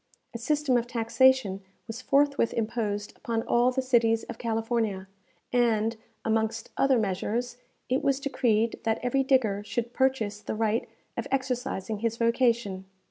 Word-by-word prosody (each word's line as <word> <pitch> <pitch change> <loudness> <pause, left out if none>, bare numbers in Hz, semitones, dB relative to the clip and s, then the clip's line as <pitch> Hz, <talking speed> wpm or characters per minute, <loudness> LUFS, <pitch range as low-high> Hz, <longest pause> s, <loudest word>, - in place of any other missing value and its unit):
A 235 - -5
system 290 0 +1
of 240 0 -1
taxation 235 -3 +2 0.2
was 235 +1 -7
forthwith 280 -2 +2
imposed 215 -2 -2
upon 225 -1 -2
all 240 +1 +3
the 260 +1 -1
cities 230 -3 +3
of 235 - -8
California, 225 -4 -1 0.5
and, 230 -2 +2 0.3
amongst 220 0 -1
other 270 -2 +3
measures, 220 +4 -2 0.3
it 255 +2 +1
was 275 -1 +2
decreed 230 -5 +1
that 225 0 +1
every 250 +2 +2
digger 255 -7 +2
should 235 +2 -3
purchase 230 -6 0
the - - -4
right 220 +1 0 0.3
of - - -3
exercising 250 -6 -2
his 230 +1 -1
vocation. 230 -5 +1
230 Hz, 140 wpm, -27 LUFS, 220-255 Hz, 0.5 s, all